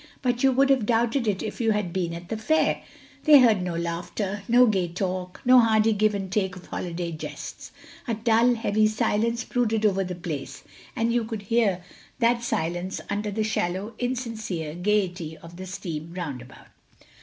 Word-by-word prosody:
But 245 -1 0
you 270 - +5
would 275 +2 +3
have 255 -6 +2
doubted 235 +1 +1
it 200 -2 0
if - - -5
you 225 -1 +3
had 205 -5 -2
been 180 -3 -1
at 170 +1 -9
the 225 - -2
fair. 310 +9 +1 0.4
They 300 -3 +9
heard 225 -6 +5
no 180 -2 -3
laughter, 175 +4 -3
no 245 +1 +6
gay 195 -6 +1
talk, 180 +1 -4
no 255 0 +8
hearty 220 -1 +4
give 210 0 +2
and 195 -2 -4
take 190 -2 0
of 180 - -11
holiday 170 -1 -4
jests. 155 - -7 0.4
A 230 - 0
dull 230 +2 +3
heavy 215 -1 +2
silence 230 +1 0
brooded 225 -3 0
over 195 -2 +2
the 180 -1 -5
place, 165 -6 -6 0.3
and 230 +1 +1
you 240 -1 +2
could 220 -2 -5
hear 200 -4 +1 0.3
that 235 -1 +2
silence 175 -3 -2
under 210 +1 -1
the 215 +2 -1
shallow 200 0 -2
insincere 225 -10 -3
gaiety 180 -3 -1
of 170 +1 -13
the 185 0 -7
steam 170 -4 -6
roundabout. 130 -8 -7
210 Hz, 180 wpm, -25 LUFS, 180-230 Hz, 0.4 s, They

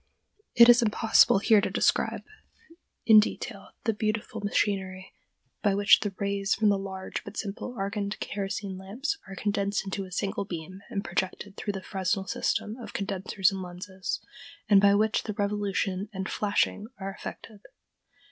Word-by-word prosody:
It 235 0 +9
is 240 +1 +7
impossible 220 -2 +4
here 215 +1 +5
to - - -1
describe - - +1 0.8
in 220 -2 +9
detail 210 - -3 0.2
the 225 - +1
beautiful 215 +1 -2
machinery 195 -2 -1 0.5
by 200 -2 +2
which 205 0 +6
the 205 - -2
rays 200 0 0
from 215 -1 +3
the 200 - +3
large 190 -1 -5
but - - -10
simple 215 +4 -5
argand 200 +1 -3
kerosene 195 -1 -4
lamp 200 +8 -10 0.2
are 195 - -8
condensed 200 0 -1
into 195 0 -3
a 185 - -13
single 195 +2 -2
beam 185 0 -7
and 200 -4 -3
projected 190 +3 -3
through 205 - -3
the 195 -1 -6
Fresnel 190 0 -1
system 210 +3 -1
of 240 - -9
condensers 195 -1 0
and 195 -1 -5
lenses, 185 +1 -5 0.5
and 200 -2 +6
by 200 0 +6
which 215 +1 +2
the 215 - -5
revolution 200 -1 -1
and 190 -1 -4
"flashing" 210 0 0
are 195 0 -4
effected. 210 +1 -9
200 Hz, 155 wpm, -28 LUFS, 190-210 Hz, 0.8 s, It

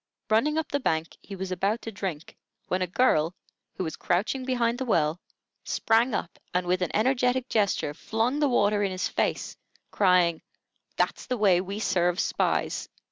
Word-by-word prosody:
Running 295 +8 +3
up 320 - -1
the 285 - +1
bank, 160 - -1
he 200 - -9
was 190 0 -5
about 195 +5 0
to 225 - -5
drink, 185 -6 -5 0.3
when 185 +1 0
a 185 - +1
girl, 175 -5 +2 0.4
who - - -3
was 160 -3 -4
crouching 205 +9 0
behind 245 -2 0
the 260 - -2
well, 165 -6 +1 0.4
sprang 225 +1 +2
up, 175 - -4 0.2
and 180 0 +1
with 180 +1 +1
an 180 - 0
energetic 250 +2 +2
gesture, 200 -8 +1
flung 225 - -1
the 295 -2 +3
water 205 -4 +2
in 200 - +1
his 185 0 -1
face, - - -1 0.4
crying: 180 -4 +3 0.6
"That's - - 0
the 250 - -1
way 190 -5 +4
we 195 +2 -5
serve 180 -4 +1
spies!" - - 0
200 Hz, 175 wpm, -27 LUFS, 180-240 Hz, 0.6 s, way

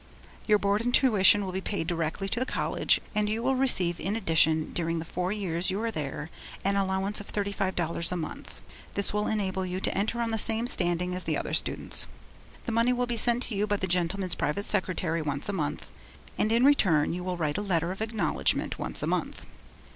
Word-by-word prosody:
Your 210 -1 +5
board 200 +1 +1
and 245 +1 0
tuition 205 -6 +5
will 185 - -4
be 190 +1 -3
paid 200 -4 -3
directly 170 +2 -2
to 230 - 0
the - - +2
college, - - +1
and 210 0 +1
you 220 +2 -1
will 265 +1 +2
receive 190 -10 +2
in 200 +3 -2
addition 160 -6 +2
during 165 -1 -1
the 165 - -4
four 180 +2 -2
years 180 -4 -1
you 190 +2 -1
are 230 - -1
there, 150 -1 -5 0.3
an 200 0 +2
allowance 195 +1 0
of 205 - -9
thirty 200 -1 -2
five 190 -2 -2
dollars 170 0 -1
a 180 - -1
month. 160 -2 -7 0.3
This 200 0 0
will 210 0 0
enable 190 -3 -1
you 185 0 -3
to - - 0
enter 215 +4 -1
on 230 -1 0
the 225 - 0
same 225 +2 +2
standing 180 -5 0
as 180 0 -5
the - - 0
other - - -4
students. - - 0 0.6
The - - -2
money 230 +2 +3
will 250 0 0
be 240 -1 -1
sent 240 +2 +2
to 220 - -3
you 205 +2 0
by 205 - +1
the 190 - -2
gentleman's 180 +1 0
private 200 +8 -1
secretary 180 -4 0
once 145 +1 -3
a - - -1
month, 150 -5 -3 0.4
and 215 - +1
in 235 +3 +4
return, 185 - +4
you 180 +1 -4
will 180 -1 -3
write 155 +1 -1
a - - -2
letter 175 -4 0
of 195 - -7
acknowledgment 220 -1 0
once - - +1
a - - -1
month. - - -2
195 Hz, 220 wpm, -28 LUFS, 175-215 Hz, 0.6 s, Your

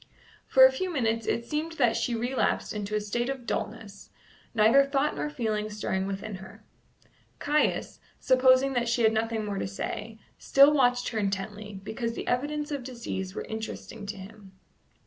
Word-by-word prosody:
For - - +8
a - - +6
few 375 -7 -3
minutes 230 -7 0
it 235 - 0
seemed 310 +4 -3
that 245 -7 +2
she 240 - 0
relapsed 245 +3 0
into 210 0 -3
a - - +2
state 240 +4 -2
of 265 -3 -4
dulness, 200 -2 -5 0.5
neither 225 +6 +6
thought 275 +1 0
nor 300 - -2
feeling 215 -6 -2
stirring 195 -2 -2
within 195 +1 -5
her. 190 0 -13 0.7
Caius, 300 +1 0 0.2
supposing 260 +1 +4
that 240 -2 0
she 235 0 +1
had 220 0 +5
nothing 220 0 -1
more 200 -1 -3
to - - -2
say, 215 +3 -5 0.2
still 280 +2 +6
watched 245 -3 +2
her 225 - -2
intently, 200 +1 -3
because 230 +2 -3
the - - -6
evidences 295 +4 -1
of 280 -3 -3
disease 230 -7 -5
were - - -4
interesting 220 -1 -6
to 205 0 -5
him. 195 0 -12
230 Hz, 170 wpm, -28 LUFS, 210-270 Hz, 0.7 s, For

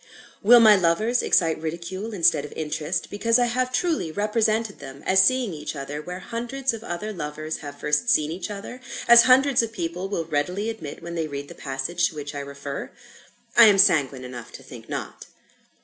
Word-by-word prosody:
Will 240 +4 +7
my 215 -2 +7
lovers 200 +7 +1
excite 165 -3 +2
ridicule 170 +6 -5
instead 170 -7 +2
of 150 - -9
interest, 155 +2 -3
because 230 +3 +2
I 245 - +3
have 250 +2 -1
truly 305 - -1
represented 215 +2 0
them 135 0 -11
as 190 0 +5
seeing 255 -4 +1
each 150 0 -6
other 145 +1 -6
where 180 +3 -7
hundreds 240 +3 -3
of 225 -1 -8
other 210 +2 -5
lovers 155 -2 -5
have 145 -1 -10
first 150 +11 0
seen 155 -10 +2
each 180 +5 -5
other, 210 +5 -8 0.3
as 235 0 +8
hundreds 265 0 +5
of 230 -1 -4
people 180 -1 -4
will 170 -5 -2
readily 180 +8 -2
admit 160 -10 -9
when 170 0 -6
they 165 -2 -2
read 145 -1 -7
the - - -9
passage 135 +6 -2
to - - -14
which 145 -1 -6
I 145 - -5
refer? 140 0 -7 0.7
I 235 - +9
am 205 -2 +6
sanguine 140 -8 +3
enough 125 -2 -9
to - - -11
think - - -13
not. - - -6
180 Hz, 195 wpm, -24 LUFS, 150-225 Hz, 0.7 s, I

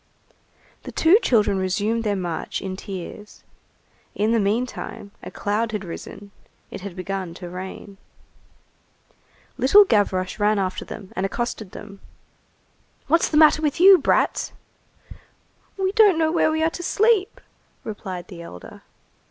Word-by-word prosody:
The - - -9
two 345 +7 +5
children 210 - +2
resumed 205 +5 -1
their 210 -2 0
march 175 -4 -4
in 190 -1 -5
tears. 195 +2 -9 0.7
In 215 +2 +1
the 230 - +3
meantime, 210 -1 -3
a - - -8
cloud 215 +2 -2
had 205 -2 -3
risen; 200 +4 -9 0.4
it - - -7
had 195 -2 -8
begun 185 -2 -5
to 175 -1 -9
rain. 190 +2 -8 1.6
Little 400 +11 +7
Gavroche 195 - 0
ran 210 +1 +2
after 190 -1 -2
them 200 -4 -10
and 185 - -2
accosted 215 -1 -4
them:— 200 -1 -10 1.1
"What's 330 +1 +2
the 300 - +1
matter 310 0 +6
with 300 0 -1
you, 380 +1 +8
brats?" - - +1 1.2
"We 380 -1 0
don't 410 -4 +5
know 320 -1 +2
where 330 -1 +2
we 315 0 0
are 325 - +2
to 350 - -7
sleep," 415 +2 +1 0.4
replied 185 -4 -7
the 175 -4 -10
elder. 90 - -11
210 Hz, 140 wpm, -23 LUFS, 190-310 Hz, 1.6 s, you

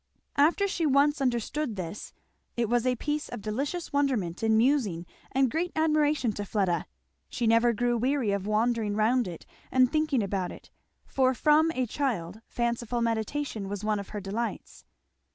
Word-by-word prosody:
After 330 +8 +4
she 340 -4 0
once 285 +1 +3
understood 250 +1 -1
this 185 +1 -6 0.5
it 235 -1 +1
was 240 +2 +1
a 250 - +2
piece 295 +4 -3
of 240 -4 -7
delicious 280 +11 -3
wonderment 250 -12 0
and 220 -1 +3
musing 225 - +2 0.3
and 265 -2 +2
great 345 +3 -1
admiration 305 -5 +2
to 205 - -4
Fleda; 190 -5 0 0.4
she 240 - -2
never 230 +1 +4
grew 240 +2 0
weary 255 -3 +1
of 200 0 -2
wandering 215 -1 +1
round 230 +2 +2
it 170 -2 -8 0.3
and 255 0 +4
thinking 305 -6 +1
about 190 -2 -2
it, - - -13 0.3
for 260 -1 +1
from 310 +4 +4
a 255 - +1
child 220 - -3
fanciful 235 0 -1
meditation 225 -1 -2
was 205 0 -5
one 210 -1 0
of 200 - -8
her 210 - -5
delights. 205 +2 -5
240 Hz, 165 wpm, -28 LUFS, 210-280 Hz, 0.5 s, After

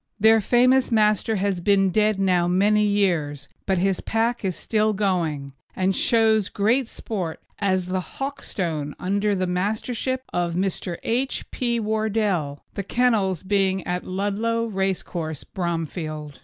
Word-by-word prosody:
Their 220 +1 +6
famous 250 +4 +3
Master 215 0 +2
has 195 -2 -1
been 195 0 +3
dead 215 0 +2
now 180 -3 +2
many 205 +4 +3
years, 170 -9 0 0.2
but 190 -1 +2
his 190 +1 +1
pack 230 +1 0
is 185 -3 -1
still 215 -1 +1
going, 170 -9 -1 0.2
and 190 0 +1
shows 220 -4 +3
great 230 +5 +1
sport 185 -9 -4 0.2
as 185 -3 +1
the 185 0 0
Hawkstone 175 - -4
under 200 +2 0
the 185 -1 0
Mastership 220 +8 -2
of 175 -1 -1
Mr. 180 -2 -2
H. 255 +4 -1
P. 235 -2 -1
Wardell, 210 -9 -1
the 200 - -3
kennels 200 -5 +1
being 190 -1 +1
at 180 0 -2
Ludlow 205 +5 -1
race 195 -3 -1
course, 160 -3 -5
Bromfield. 160 -4 -4
195 Hz, 140 wpm, -23 LUFS, 180-220 Hz, 0.2 s, Their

